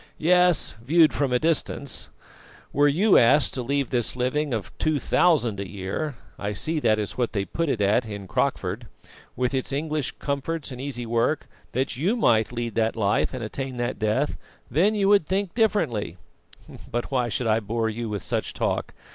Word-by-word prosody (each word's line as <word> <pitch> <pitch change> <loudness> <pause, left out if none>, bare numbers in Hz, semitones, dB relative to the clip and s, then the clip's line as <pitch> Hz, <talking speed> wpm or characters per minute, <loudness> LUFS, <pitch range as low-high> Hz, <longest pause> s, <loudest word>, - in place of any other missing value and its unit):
"Yes, 180 -4 +3
viewed 160 +4 +5
from 140 -3 0
a 125 - +4
distance. 145 -3 -1 0.6
Were 145 +1 +4
you 185 +9 +5
asked 140 +5 +4
to 130 - -2
leave 140 +2 -1
this 120 -2 0
living 130 +4 0
of 110 -7 -4
two 155 -1 +1
thousand 135 - +2
a 100 -2 -5
year 100 +10 -4 0.2
I 105 0 -2
see 155 +10 -1
that 110 -6 +3
is 105 +3 -4
what 120 - 0
they 100 -2 -1
put 165 - -2
it 115 - 0
at 105 +4 +2
in 100 -2 -7
Crockford 100 +2 -1 0.5
with 125 +1 -1
its 130 +1 -1
English 150 0 -2
comforts 140 +2 -3
and 125 0 -7
easy 130 -3 -4
work, 115 +6 0 0.3
that 130 0 -1
you 180 - +1
might 115 - +3
lead 120 -2 -3
that 115 -1 +1
life 105 -3 +1
and 130 -2 -5
attain 130 +3 -5
that 120 +1 -2
death, 110 +7 0 0.3
then 195 +8 +3
you 200 -2 +2
would 200 -6 +4
think 190 -1 -1
differently. 155 - 0 0.7
But 120 +3 -3
why 125 -3 +1
should 120 - -2
I 110 0 +3
bore 115 +1 -1
you 110 +1 -3
with 105 -4 -4
such - - -2
talk? - - -2
125 Hz, 185 wpm, -25 LUFS, 110-150 Hz, 0.7 s, viewed